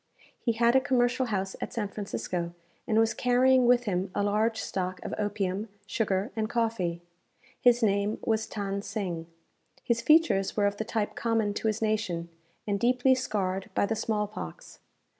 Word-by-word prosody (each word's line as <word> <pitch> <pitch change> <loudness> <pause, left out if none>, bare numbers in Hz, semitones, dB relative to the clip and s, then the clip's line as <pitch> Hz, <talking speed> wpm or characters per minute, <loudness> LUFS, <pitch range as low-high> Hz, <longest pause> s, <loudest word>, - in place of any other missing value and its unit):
He 235 - 0
had 235 +2 +3
a 265 - +6
commercial 250 0 +1
house 195 -3 -2
at - - -4
San 220 -3 -1
Francisco, 180 -4 -4 0.3
and 220 - +2
was 225 0 +4
carrying 250 0 +4
with 245 0 +5
him 190 -3 -1
a 205 - +1
large 215 +2 +1
stock 185 -1 -3
of - - -4
opium, 205 0 -2 0.2
sugar, 200 +1 -1
and 215 -1 -1
coffee. 210 -8 -1 0.6
His 245 -1 +5
name 200 0 +2
was 220 -1 +1
Than 200 -1 -3
Sing. 180 -6 -4 0.6
His 235 -1 +1
features 305 -10 +3
were 205 - +3
of 200 0 0
the 220 - -3
type 215 -2 -1
common 225 -3 0
to 220 - -2
his 220 +1 0
nation, 210 -6 -1 0.4
and 200 -1 -1
deeply 250 +3 +4
scarred 195 -7 -2
by - - +3
the 225 - -1
small 215 -1 0
pox. 85 - -9
215 Hz, 170 wpm, -28 LUFS, 195-235 Hz, 0.6 s, a